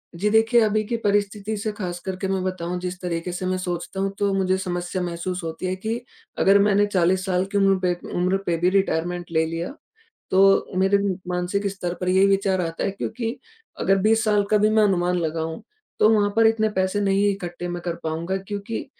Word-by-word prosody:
जी, 200 Hz, +5 st, 0 dB
देखिए, 225 Hz, +2 st, +4 dB
अभी 215 Hz, 0 st, +2 dB
की 230 Hz, +3 st, -2 dB
परिस्थिति 205 Hz, 0 st, 0 dB
से 215 Hz, +1 st, -2 dB
ख़ासकर 185 Hz, -2 st, -5 dB
के 190 Hz, -, 0 dB
मैं 190 Hz, 0 st, -1 dB
बताऊँ, 180 Hz, -1 st, -3 dB
जिस 180 Hz, 0 st, -5 dB
तरीक़े 175 Hz, 0 st, -3 dB
से 180 Hz, +1 st, -4 dB
मैं 185 Hz, 0 st, 0 dB
सोचता 180 Hz, +1 st, -4 dB
हूँ 195 Hz, 0 st, 0 dB
तो 200 Hz, -1 st, +2 dB
मुझे 190 Hz, -1 st, +1 dB
समस्या 180 Hz, 0 st, -3 dB
महसूस 175 Hz, +1 st, -4 dB
होती 165 Hz, +3 st, -5 dB
है 185 Hz, 0 st, -1 dB
कि, 220 Hz, +5 st, -3 dB, 0.4 s
अगर 195 Hz, +1 st, +5 dB
मैंने 205 Hz, 0 st, +4 dB
40 185 Hz, -1 st, +1 dB
साल 185 Hz, -1 st, +1 dB
की 205 Hz, -, 0 dB
उम्र 195 Hz, -1 st, +4 dB
पे 180 Hz, -, +3 dB, 0.2 s
उम्र 180 Hz, +2 st, +1 dB
पे 170 Hz, -, +1 dB
भी 175 Hz, +2 st, +2 dB
रिटायरमेंट 175 Hz, -2 st, 0 dB
ले 160 Hz, 0 st, +2 dB
लिया, 165 Hz, +7 st, -4 dB, 0.6 s
तो 195 Hz, 0 st, +4 dB
मेरे 195 Hz, +1 st, +4 dB, 0.3 s
मानसिक 180 Hz, +3 st, -1 dB
स्तर 180 Hz, -3 st, -4 dB
पर 180 Hz, -, 0 dB
यही 190 Hz, +2 st, +4 dB
विचार 195 Hz, -1 st, +2 dB
आता 165 Hz, -1 st, -3 dB
है, -, -, 0 dB
क्योंकि 230 Hz, +5 st, -4 dB, 0.4 s
अगर 195 Hz, -, +3 dB
20 220 Hz, +3 st, +3 dB
साल 210 Hz, -2 st, +3 dB
का 215 Hz, -, +5 dB
भी 210 Hz, +1 st, +3 dB
मैं 215 Hz, 0 st, +4 dB
अनुमान 180 Hz, -3 st, +2 dB
लगाऊँ, 160 Hz, 0 st, -3 dB, 0.4 s
तो 215 Hz, -, +6 dB
वहाँ 210 Hz, -2 st, +3 dB
पर 225 Hz, 0 st, +5 dB
इतने 220 Hz, -1 st, +2 dB
पैसे 190 Hz, +2 st, +1 dB
नहीं 200 Hz, 0 st, +2 dB
इकट्ठे 175 Hz, -2 st, -5 dB
मैं 175 Hz, 0 st, -4 dB
कर 170 Hz, -1 st, -2 dB
पाऊँगा, 165 Hz, +4 st, -2 dB
क्योंकि 200 Hz, +3 st, -5 dB
190 Hz, 205 wpm, -23 LUFS, 180-205 Hz, 0.6 s, तो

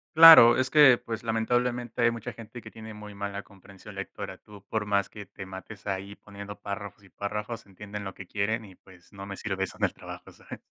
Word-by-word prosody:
Claro, 160 Hz, -7 st, +11 dB
es 130 Hz, 0 st, 0 dB
que, 145 Hz, -5 st, +8 dB
pues, 115 Hz, -1 st, -6 dB
lamentablemente, 120 Hz, +2 st, -1 dB
hay 120 Hz, -, +5 dB
mucha 115 Hz, +1 st, -5 dB
gente 115 Hz, +1 st, -10 dB
que -, -, -11 dB
tiene 110 Hz, -1 st, -10 dB
muy 105 Hz, -1 st, -10 dB
mala 100 Hz, 0 st, -5 dB
comprensión 100 Hz, -1 st, -15 dB
lectora. -, -, -7 dB
Tú 100 Hz, -1 st, -15 dB
por 110 Hz, -2 st, -2 dB
más 100 Hz, -1 st, +1 dB
que 105 Hz, -2 st, -11 dB
te 95 Hz, -, -9 dB
mates 95 Hz, +2 st, -10 dB
ahí 100 Hz, 0 st, -4 dB
poniendo 100 Hz, 0 st, -10 dB
párrafos 100 Hz, 0 st, -7 dB
y 100 Hz, -, -18 dB
párrafos 105 Hz, +4 st, -5 dB
entienden 100 Hz, +1 st, -8 dB
lo 95 Hz, -1 st, -7 dB
que 95 Hz, -, -9 dB
quieren 110 Hz, +4 st, -2 dB
y 95 Hz, -2 st, -14 dB
pues 90 Hz, 0 st, -20 dB
no 100 Hz, 0 st, -8 dB
me 100 Hz, -1 st, -7 dB
sirve 95 Hz, -3 st, -2 dB
eso -, -, -11 dB
en -, -, -6 dB
el -, -, -2 dB
trabajo, -, -, -10 dB
¿sabes? -, -, -11 dB
105 Hz, 220 wpm, -27 LUFS, 100-115 Hz, -, Claro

